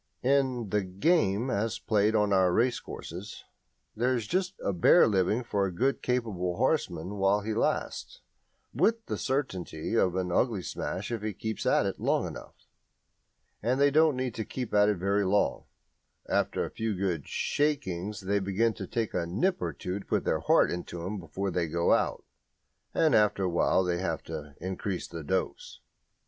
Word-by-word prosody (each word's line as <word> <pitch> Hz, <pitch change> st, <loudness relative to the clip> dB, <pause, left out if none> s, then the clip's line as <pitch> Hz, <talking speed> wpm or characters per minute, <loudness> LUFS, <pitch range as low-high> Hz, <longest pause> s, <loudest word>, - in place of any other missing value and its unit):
In 130 Hz, -4 st, +1 dB
"the 105 Hz, -, +2 dB
game" 100 Hz, -, +1 dB
as 110 Hz, +1 st, -1 dB
played 105 Hz, 0 st, +1 dB
on 105 Hz, -2 st, +2 dB
our 95 Hz, -2 st, +4 dB
racecourses 105 Hz, -4 st, -3 dB, 0.5 s
there 125 Hz, +3 st, +1 dB
is 115 Hz, -3 st, -2 dB
just 185 Hz, -, -1 dB
a 100 Hz, -, 0 dB
bare 90 Hz, -, +6 dB
living 105 Hz, +3 st, +1 dB
for 100 Hz, -4 st, 0 dB
a -, -, -4 dB
good 130 Hz, +10 st, 0 dB
capable 105 Hz, -8 st, -1 dB
horseman 100 Hz, -, -1 dB
while 100 Hz, +2 st, +3 dB
he 110 Hz, +2 st, -3 dB
lasts, -, -, -2 dB, 0.5 s
with 225 Hz, 0 st, +2 dB
the -, -, -3 dB
certainty 95 Hz, -, -3 dB
of 95 Hz, -6 st, +2 dB
an 90 Hz, -1 st, -1 dB
ugly 105 Hz, -1 st, +1 dB
smash 95 Hz, +6 st, -4 dB
if 115 Hz, -3 st, -2 dB
he 105 Hz, 0 st, -3 dB
keeps 110 Hz, +3 st, -4 dB
at -, -, +3 dB
it -, -, -3 dB
long -, -, +1 dB
enough. -, -, -10 dB, 1.0 s
And 125 Hz, +3 st, 0 dB
they 140 Hz, 0 st, +5 dB
don't 155 Hz, -2 st, +4 dB
need 130 Hz, -2 st, -2 dB
to 110 Hz, -, -3 dB
keep 125 Hz, 0 st, -5 dB
at 105 Hz, 0 st, +5 dB
it 105 Hz, -, +1 dB
very 100 Hz, +3 st, +1 dB
long. 100 Hz, +2 st, +1 dB, 0.6 s
After -, -, 0 dB
a -, -, -8 dB
few 110 Hz, -2 st, -2 dB
good 90 Hz, -6 st, -2 dB
"shakings" 105 Hz, -, -1 dB
they 100 Hz, +2 st, 0 dB
begin 100 Hz, +4 st, +1 dB
to -, -, -7 dB
take 115 Hz, -2 st, -2 dB
a 85 Hz, -2 st, -1 dB
nip 180 Hz, -, 0 dB
or -, -, -1 dB
two 90 Hz, +2 st, -4 dB
to -, -, -12 dB
put -, -, 0 dB
heart -, -, +3 dB
into 85 Hz, -1 st, -5 dB
them 100 Hz, +3 st, -4 dB
before 95 Hz, +4 st, -4 dB
they 85 Hz, -1 st, 0 dB
go 85 Hz, +2 st, +2 dB
out, -, -, 0 dB, 0.7 s
and 160 Hz, -4 st, +2 dB
after 105 Hz, -3 st, +3 dB
a 90 Hz, -, +1 dB
while 85 Hz, +2 st, +3 dB
they 90 Hz, -1 st, -1 dB
have 85 Hz, -4 st, -2 dB
to 75 Hz, -3 st, -7 dB
increase 95 Hz, 0 st, -4 dB
the 85 Hz, -2 st, -7 dB
dose. 95 Hz, +5 st, -3 dB
100 Hz, 180 wpm, -29 LUFS, 90-120 Hz, 1.0 s, bare